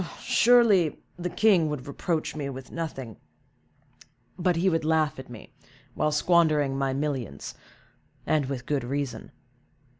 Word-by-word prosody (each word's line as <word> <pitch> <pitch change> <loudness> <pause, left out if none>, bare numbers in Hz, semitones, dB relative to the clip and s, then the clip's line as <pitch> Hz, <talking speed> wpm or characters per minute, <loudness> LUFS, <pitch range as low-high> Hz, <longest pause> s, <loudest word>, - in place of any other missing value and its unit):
"Surely 225 -9 +4 0.2
the 180 0 -4
king 185 -5 +3
would 145 -4 -5
reproach 155 +3 -2
me 145 -2 -3
with 130 -1 -9
nothing, 135 - -6 1.2
but 180 -1 +1
he 170 +3 +1
would 165 -3 +1
laugh 155 -3 +1
at 130 - -10
me, 120 -3 -12 0.4
while 150 - 0
squandering 150 -3 +3
my 135 0 0
millions, 135 - -3 0.7
and 150 -3 +1
with 130 -2 -5
good 145 -2 -1
reason." 130 -2 -4
150 Hz, 130 wpm, -26 LUFS, 135-170 Hz, 1.2 s, Surely